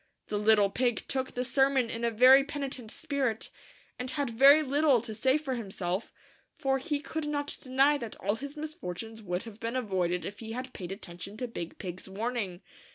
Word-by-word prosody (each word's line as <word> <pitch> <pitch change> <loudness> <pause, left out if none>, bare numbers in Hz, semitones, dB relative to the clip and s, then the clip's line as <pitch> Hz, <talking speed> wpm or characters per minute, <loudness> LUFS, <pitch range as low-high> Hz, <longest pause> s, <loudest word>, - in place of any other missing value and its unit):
The 210 - 0
little 210 -2 +4
pig 245 0 0
took 260 -1 -2
the 250 +1 -1
sermon 270 -1 +3
in 230 - -4
a 235 - +3
very 255 +4 +7
peni 280 -1 -4
tent 240 -5 -4
spirit, 255 -2 -2 0.5
and 250 +1 -3
had 280 -2 -1
very 280 +6 +7
little 285 -2 +4
to 225 -1 -7
say 260 +6 +3
for 295 -4 -3
himself, 195 -4 -3 0.5
for 270 0 +1
he 295 +1 -1
could 310 +1 -4
not 290 -1 -2
deny 275 +3 +3
that 230 -4 -6
all 200 +1 -1
his 280 +6 -6
misfor 305 - -5
tunes 225 +1 -8
would 180 -1 -3
have 225 -2 -11
been 230 +2 -3
avoided 185 -7 0
if 205 0 -6
he 225 -1 -6
had 255 +1 -5
paid 180 -1 -6
attention 195 +1 -7
to 250 - -3
Big 170 -8 -6
Pig's 185 0 -7
warning. 205 -3 -3
240 Hz, 200 wpm, -30 LUFS, 210-275 Hz, 0.5 s, very